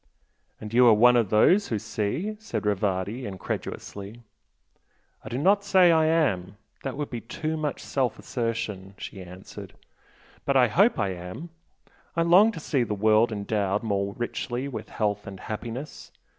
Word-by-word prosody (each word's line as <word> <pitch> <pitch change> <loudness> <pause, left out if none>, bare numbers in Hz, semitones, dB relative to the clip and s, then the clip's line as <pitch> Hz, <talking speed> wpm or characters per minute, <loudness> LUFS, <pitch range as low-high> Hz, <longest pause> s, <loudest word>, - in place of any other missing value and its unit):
"And 110 0 -8
you 125 +1 +6
are 115 - +7
one 120 +3 +6
of 115 -5 +2
'those 180 - +4
who 110 - -1
see'? 110 - -3
" - - -34
said 220 - -4
Rivardi, 100 +3 -1
incredulously. 100 +3 -6 1.0
"I - - -8
do 120 - -3
not 200 +8 +3
say 190 -3 +5
I 160 -1 +4
am, 105 - +1 0.2
that 135 -1 -5
would 145 -1 -4
be 120 -2 -4
too 160 0 -4
much 155 -2 -3
self 130 -4 -1
assertion" 105 -5 -4
she 95 - -8
answered 90 +1 -10 0.7
"But 140 -1 +2
I 125 -3 +5
hope 200 - +4
I 100 - 0
am! 90 - -7 0.7
I 165 - +2
long 185 +6 +6
to - - -6
see 140 -3 0
the 110 -3 -1
world 110 +3 +3
endowed 100 -1 -1
more 100 -2 -1
richly 120 +2 -3
with 135 - -7
health 105 -2 -2
and 95 -1 -8
happiness. 120 +6 -7
115 Hz, 165 wpm, -26 LUFS, 100-150 Hz, 1.0 s, are